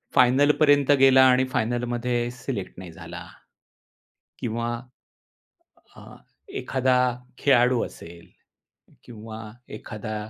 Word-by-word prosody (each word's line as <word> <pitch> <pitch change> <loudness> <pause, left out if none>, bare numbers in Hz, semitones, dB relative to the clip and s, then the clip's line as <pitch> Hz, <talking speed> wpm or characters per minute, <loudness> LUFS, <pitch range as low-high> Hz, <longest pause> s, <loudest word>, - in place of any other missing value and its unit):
फायनलपर्यंत 145 +2 +4
गेला 130 -1 +6
आणि 130 +1 +3
फायनलमध्ये 120 +1 -1
सेलेक्ट 120 -5 -6
नाही 90 -2 -9
झाला. 85 +1 -10 1.1
किंवा 115 0 -3 1.3
अ, - - -13 0.5
एखादा 130 - 0 0.4
खेळाडू 125 -3 +3
असेल 85 0 -13 0.8
किंवा 110 -1 -10 0.4
एखादा, 110 -1 -7
120 Hz, 80 wpm, -24 LUFS, 110-130 Hz, 1.3 s, गेला